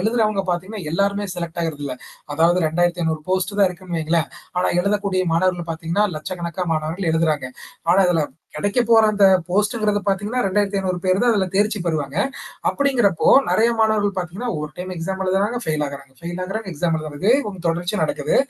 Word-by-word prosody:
எழுதுறவங்க 215 -1 +1
பார்த்தீங்கன்னா 185 +4 -3
எல்லாருமே 200 +4 0
செலெக்ட் 170 -1 -4
ஆகறதில்ல. 145 -5 -3 0.4
அதாவது 170 +2 +3
2500 165 -1 0
போஸ்ட் 190 +2 0
தான் 200 -2 +5
இருக்குன்னு 180 -1 -5
வைங்களேன். 160 0 +1 0.3
ஆனா 180 - +2
எழுதக்கூடிய 200 -1 0
மாணவர்கள் 175 -1 0
பார்த்தீங்கன்னா, 165 +5 0
லட்சக்கணக்கா 170 +2 -4
மாணவர்கள் 160 +3 -2
எழுதுறாங்க. 155 -4 +1 0.5
ஆனா 190 - +4
இதில 165 -4 +2 0.3
கெடைக்க 205 +9 0
போற 225 -1 +7
அந்த 205 -1 +3 0.2
போஸ்ட்ங்கிறது 210 +2 +1
பார்த்தீங்கன்னா, 205 +6 0
2500 195 -2 0
பேர் 185 +1 +3
தான் 240 -1 +4
அதில 195 -2 +1
தேர்ச்சி 210 +1 +2
பெறுவாங்க. 150 -3 -2 0.5
அப்படிங்கிறப்போ, 240 - +1 0.2
நெறைய 230 +2 +4
மாணவர்கள் 215 -2 +2
பார்த்தீங்கன்னா, 185 +7 -4
ஒரு 150 0 -5
டைம் 185 +1 -5
எக்ஸாம் 190 +3 -4
எழுதுறாங்க, 195 +5 +1
ஃபெயில் 155 -1 0
ஆகுறாங்க. 140 -1 -10
ஃபெயில் 175 +2 -5
ஆகுறாங்க, 205 +2 -5
எக்ஸாம் 165 +2 0
எழுதுறாங்க. 155 -1 -7
இதே 225 +6 +5
வந்து 190 -4 -8
தொடர்ச்சியா 175 +5 -1
நடக்குது. 150 0 0
185 Hz, 160 wpm, -21 LUFS, 165-205 Hz, 0.5 s, போற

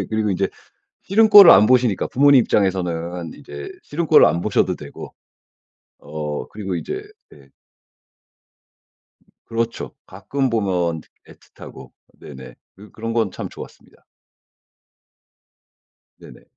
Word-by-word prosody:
예. 95 - -4
그리고 110 -1 -1
인제 95 - -1 0.6
싫은 220 +3 +3
꼴을 200 -4 +10
안 105 - +6
보시니까. 125 -5 +1
부모님 140 -1 +4
입장에서는 90 -4 -2
이제 145 - -10
싫은 160 +2 -4
꼴을 155 - +6
안 85 - -1
보셔도 - - 0
되고. - - -11 0.9
어 75 -3 -6
그리고 95 -3 -6
이제 395 - -5 0.3
네. 70 -2 -19 2.0
그렇죠. 115 0 -4
가끔 135 -2 -4
보면 90 -7 -1 0.3
애틋하고. 65 -1 -15 0.3
네네. 65 -2 -12 0.2
그 105 +2 -16
그런 115 +1 -6
건 115 -1 0
참 - - -7
좋았습니다. - - -14 2.1
네네. - - -16
105 Hz, 245 characters per minute, -20 LUFS, 85-130 Hz, 2.1 s, 꼴을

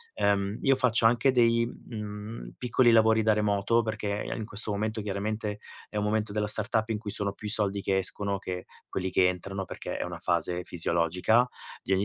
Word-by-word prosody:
ehm, 100 +1 +1
io 135 -1 +4
faccio 125 -3 +3
anche 120 +3 +4
dei, 115 -1 +3
mhmm, 105 -1 -8
piccoli 125 0 +3
lavori 110 0 +5
da 110 - +4
remoto 105 +2 +1
perché 105 -2 -3
in 110 - -5
questo 105 0 -4
momento 110 +1 -2
chiaramente 105 +1 -3 0.3
è 105 - -5
un 105 - 0
momento 105 0 0
della 105 0 -1
startup 110 +1 +2
in 110 - 0
cui 105 -2 -6
sono 100 -1 -1
più 105 - -8
i 105 - +2
soldi 100 -2 +2
che 95 0 0
escono 100 +1 +2
che 90 -1 -5 0.3
quelli 95 0 -2
che 90 -1 +4
entrano, 95 +2 -4
perché - - -6
è - - -2
una - - -6
fase 90 +1 0
fisiologica 90 +8 +1 0.4
di - - -4
ogni 95 - +2
105 Hz, 195 wpm, -28 LUFS, 100-110 Hz, 0.4 s, lavori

